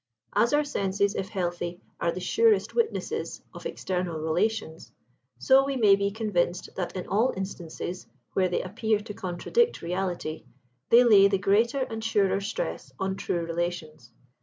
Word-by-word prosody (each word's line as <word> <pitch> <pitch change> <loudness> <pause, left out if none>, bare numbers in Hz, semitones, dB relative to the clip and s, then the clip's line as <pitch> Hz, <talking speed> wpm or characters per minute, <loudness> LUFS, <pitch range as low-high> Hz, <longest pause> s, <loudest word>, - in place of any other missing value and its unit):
As 235 - +3
our 295 +1 +3
senses, 200 -7 0
if 190 -2 -3
healthy, 175 -2 -3 0.2
are 170 - +1
the 185 - -5
surest 440 - +2
witnesses 455 -1 -2
of - - -6
external 180 -3 -3
relations, 160 +2 -1 0.5
so 270 0 +5
we 275 0 -2
may 210 -6 +6
be 200 0 0
convinced 200 -5 -1
that, 180 0 -4
in 185 - -4
all 225 +6 +2
instances 180 -1 -6 0.3
where 185 -1 +2
they 180 - -1
appear 215 +3 0
to 210 0 -8
contradict 215 - 0
reality, 175 -2 -3 0.5
they 240 +2 +8
lay 205 -5 +7
the 200 0 +1
greater 220 +7 +2
and 225 -3 -4
surer 200 -3 +2
stress 460 - -4
on 190 0 -1
true 170 -3 -2
relations. 165 -6 -4
195 Hz, 155 wpm, -27 LUFS, 175-225 Hz, 0.5 s, they